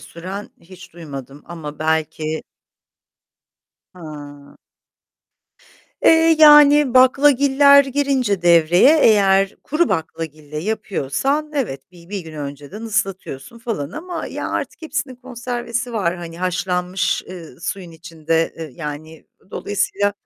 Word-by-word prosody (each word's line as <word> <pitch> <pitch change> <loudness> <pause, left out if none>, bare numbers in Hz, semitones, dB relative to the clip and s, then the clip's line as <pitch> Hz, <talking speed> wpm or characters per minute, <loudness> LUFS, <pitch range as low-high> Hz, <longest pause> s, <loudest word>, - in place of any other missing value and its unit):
süren 190 +5 -8
hiç 185 +1 -15
duymadım 140 -4 -10
ama 155 -4 -8
belki 155 0 -2 1.5
Hıı. 145 -4 -11 1.4
Eee, 325 0 +5
yani, 295 -3 +7
baklagiller 280 +2 +5
girince 265 -8 0
devreye, 175 - +5
eğer 195 -2 +4
kuru 320 +4 0
baklagille 155 -3 -5
yapıyorsan, 220 - -2
evet, 180 - -4
bi 170 -1 -17
bir 200 0 -4
gün 165 -2 -11
önceden 145 +7 -8
ıslatıyorsun 195 - -4
falan 225 - -4
ama 340 - -6
ya, - - -5
artık - - -4
hepsinin 290 -4 -4
konservesi 240 -1 -5
var; 185 -5 -1
hani 170 -1 -9
haşlanmış, 180 0 -1
eee, 175 -3 -11
suyun 180 0 -5
içinde, 165 0 -2
eee, 160 -2 -7
yani 155 +1 -8 0.2
dolayısıyla, 205 0 -1
185 Hz, 105 wpm, -20 LUFS, 160-250 Hz, 1.5 s, yani